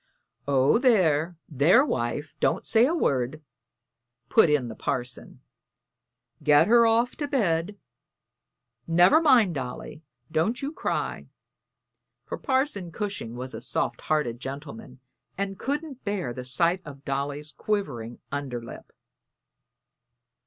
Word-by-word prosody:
"Oh, 140 - +3
there, 175 - +3
there, 165 - +4
wife; 145 - -2
don't - - +1
say 230 +2 +4
a 330 - 0
word," 140 - -1 0.9
put 220 -8 +5
in 145 -4 +2
the 115 - -6
parson. 125 +2 -4 1.0
"Get 150 +1 +5
her 235 +2 +5
off 230 +2 +2
to 290 - -2
bed. 200 - 0 1.1
Never 175 - +5
mind, 245 - +5
Dolly, 135 +2 -6 0.3
don't 170 +10 0
you 280 +1 -3
cry;" - - -3 1.0
for - - -6
Parson 260 - -1
Cushing 200 - -4
was 130 +1 -6
a - - -7
soft - - -2
hearted 150 -7 -1
gentleman 135 -2 -8 0.4
and 195 0 -3
couldn't 285 -1 -4
bear 195 -12 -2
the 125 +1 -7
sight 170 +7 +1
of 140 -2 -11
Dolly's 140 +1 -3
quivering 140 - -3
under 140 -4 -3
lip. 115 - -11
160 Hz, 120 wpm, -26 LUFS, 135-220 Hz, 1.1 s, put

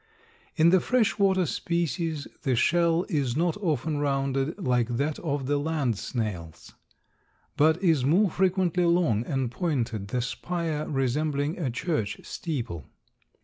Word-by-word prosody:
In 165 0 +5
the 185 - +6
fresh 225 0 +1
water 190 -2 +3
species 165 -1 -2
the 130 -2 +1
shell 170 +6 +2
is 140 - -1
not 170 0 +1
often 155 - -1
rounded 135 +1 0
like 125 - +1
that 145 +3 -1
of 145 -5 -2
the 145 +2 +1
land 145 -6 0
snails, 95 -8 -5 0.8
but 160 +3 +4
is 160 -8 +3
more 175 +8 +3
frequently 180 -1 +1
long 170 -11 +2
and 135 -4 -1
pointed, 125 - -2
the 125 +3 -1
spire 160 +2 -3
resembling 145 +3 -1
a 145 -7 -1
church 125 - -2
steeple. 115 - -5
150 Hz, 135 wpm, -27 LUFS, 130-170 Hz, 0.8 s, the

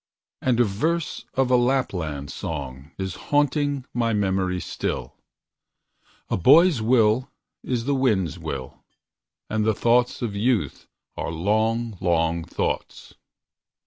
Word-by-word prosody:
And 125 -2 +1
a - - +7
verse 150 +11 -1
of 130 -1 +2
a - - +6
Lapland 90 - 0
song 70 -3 -6
Is 95 -2 -3 0.2
haunting 145 -2 +1
my 115 -1 +1
memory 95 -3 0
still: - - -4 1.1
"A - - 0
boy's 150 - +6
will 115 +2 +3 0.3
is 120 -3 -2
the 140 - +1
wind's 105 - +1
will, 65 -2 -6 0.6
And 110 0 0
the 110 0 +2
thoughts 120 +2 +2
of 105 -4 -3
youth 115 +1 0 0.3
are - - -3
long, 110 +5 0
long 85 -2 +1
thoughts." 85 - -4
110 Hz, 120 wpm, -24 LUFS, 90-130 Hz, 1.1 s, a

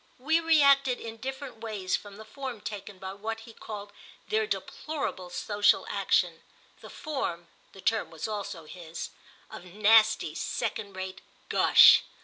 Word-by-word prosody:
We 320 +6 +2
reacted 280 -5 +4
in 225 0 -7
different 265 +1 -6
ways 210 -5 -2
from 205 -1 -8
the 220 - -10
form 260 -2 -6
taken 205 -2 -7
by 190 0 -6
what 225 +3 -5
he 225 0 -13
called 205 -2 -8 0.4
their 435 0 +1
deplorable 285 - -4
social 205 +3 +2
action—the - - -2
form 265 - -4 0.2
(the 195 - -12
term 220 +3 0
was 165 +3 -5
also 200 -6 -5
his) 165 0 -8 0.4
of - - -9
nasty 215 +4 +4
second 200 -3 -3
rate 190 0 -6 0.3
gush. - - +8
215 Hz, 135 wpm, -28 LUFS, 195-265 Hz, 0.4 s, gush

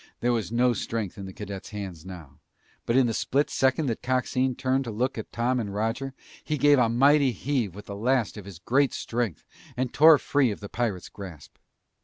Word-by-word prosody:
There 120 +1 +1
was 115 -2 -2
no 120 +1 +3
strength 110 -4 -4
in 95 - -6
the - - -7
cadet's 100 -1 -7
hands 95 -6 -7
now, 80 -7 -11 0.5
but 115 - +2
in 135 - +5
the 115 - 0
split 140 +6 0
second 135 +4 +2
that 115 -4 -2
Coxine 130 0 0
turned 130 +2 0
to - - -4
look 120 +4 -1
at 110 - -7
Tom 125 +2 0
and 105 -4 -3
Roger, 115 +6 -2 0.3
he 150 - -2
gave 145 0 +5
a 120 -2 +3
mighty 140 +3 +4
heave 120 -4 -2
with 105 +1 -10
the 100 - -7
last 120 +2 0
of 105 -3 -9
his 100 -4 -9
great 135 +10 +1
strength 115 -7 -3 0.3
and 125 -1 -2
tore 155 +1 +8
free 140 -2 +1
of 105 - -4
the 100 - -8
pirate's 110 -7 -2
grasp. 90 -8 -11
120 Hz, 210 wpm, -26 LUFS, 100-130 Hz, 0.5 s, tore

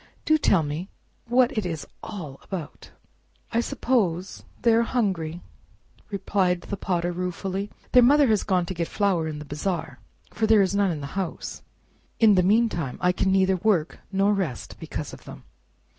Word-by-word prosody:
do 310 - +5
tell 195 - +3
me 155 +6 -4 0.4
what 250 +2 +3
it 215 - 0
is 165 -4 -4 0.2
all 160 -11 -7
about." 175 -7 -7 0.6
"I 230 - +1
suppose 195 -8 -1 0.2
they 230 - +5
are 230 - +5
hungry," 185 -9 -1 0.7
replied 190 -3 0
the 200 - -5
Potter 175 -2 -1
ruefully; 185 +3 -3 0.2
"their 250 - +7
mother 285 +4 +6
has 215 -3 +3
gone 185 -3 +1
to 185 - -4
get 170 -2 -2
flour 190 -6 +1
in 155 -1 -4
the 150 - -8
bazaar, 150 -2 -3 0.3
for 220 - 0
there 215 -2 +6
is 190 - 0
none 200 -1 +2
in 155 -4 -3
the - - -5
house. 190 -3 -4 0.6
In 220 -2 +7
the 185 - +4
meantime 185 - +1
I 180 - +3
can 190 +1 0
neither 190 0 +3
work 180 -5 +1
nor 195 +1 +3
rest 175 - -3
because - - -5
of - - -12
them." - - -10
190 Hz, 175 wpm, -25 LUFS, 170-210 Hz, 0.7 s, their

